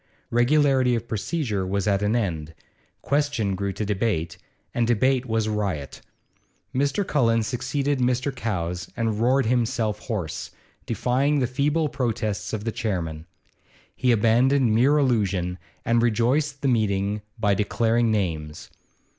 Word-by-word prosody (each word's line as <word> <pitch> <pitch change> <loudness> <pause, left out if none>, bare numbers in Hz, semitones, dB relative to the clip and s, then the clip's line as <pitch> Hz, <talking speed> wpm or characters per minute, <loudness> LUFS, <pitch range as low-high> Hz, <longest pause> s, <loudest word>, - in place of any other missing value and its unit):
Regularity 130 0 +3
of 115 0 -4
procedure 110 - -2
was 95 +2 -1
at 100 -1 +2
an 105 +3 +1
end; 80 -8 -2 0.5
question 140 -8 0
grew 100 +1 -2
to 105 - -3
debate, 95 -4 -1 0.3
and 120 -1 +1
debate 130 +3 +2
was 110 -1 0
riot. 100 -10 -3 0.7
Mr. 140 +10 0
Cullen 115 -8 +2
succeeded 135 +4 -1
Mr. 125 +2 0
Cowes 90 -7 -3
and 110 -2 -1
roared 130 +2 +3
himself 115 -2 0
hoarse, 95 -9 -4 0.4
defying 135 +4 +1
the 130 - +2
feeble 145 +5 +1
protests 115 -7 -2
of 110 -2 -3
the 115 - -1
chairman. 85 -8 -3 0.7
He 125 - +2
abandoned 120 +3 +3
mere 130 +7 +4
allusion, 100 -10 +1 0.3
and 115 0 +3
rejoiced 130 +6 +1
the - - +2
meeting 105 -3 +1 0.2
by 105 -3 +2
declaring 115 +3 +1
names. 80 -8 -2
115 Hz, 130 wpm, -24 LUFS, 100-130 Hz, 0.7 s, mere